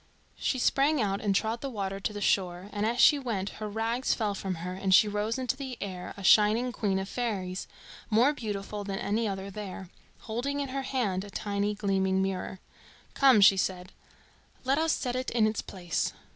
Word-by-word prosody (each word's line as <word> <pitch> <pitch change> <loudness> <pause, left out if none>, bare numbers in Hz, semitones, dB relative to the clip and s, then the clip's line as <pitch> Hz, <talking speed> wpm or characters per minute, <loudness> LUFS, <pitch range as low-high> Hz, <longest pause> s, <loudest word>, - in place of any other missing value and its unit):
She 260 - 0
sprang 275 +4 +2
out 200 -3 0
and 200 -2 +1
trod 225 +3 0
the 275 - -3
water 195 -4 -3
to 200 - -2
the 205 0 -6
shore, 185 -1 0
and 210 +1 0
as 240 +2 -1
she 290 +2 +7
went 210 -7 -2
her 215 - -3
rags 225 +4 0
fell 210 -3 -1
from 190 -1 -3
her 180 +2 -5
and 190 +1 -2
she 215 - +6
rose 210 +3 -1
into 260 +1 -1
the 265 -3 -6
air 185 -3 -6
a 200 - -8
shining 215 +5 +5
queen 205 -5 -1
of 190 0 -3
fairies, 195 -6 -3 0.4
more 240 +6 +4
beautiful 210 -4 -5
than 195 -1 -4
any 220 +3 0
other 195 0 -4
there, 190 -3 -7 0.3
holding 245 +6 -3
in 280 -1 -2
her 270 +1 -2
hand 230 -9 -1
a 205 - -9
tiny 205 +1 -2
gleaming 190 -2 +1
mirror. 190 -1 -2 0.5
"Come," 265 -6 +6
she 195 0 +7
said, 185 0 -2 0.7
"let 270 +3 +2
us 325 0 +2
set 250 -4 -1
it 255 0 -2
in 230 -2 +2
its 215 0 0
place." 175 -4 -3
210 Hz, 200 wpm, -29 LUFS, 195-245 Hz, 0.7 s, she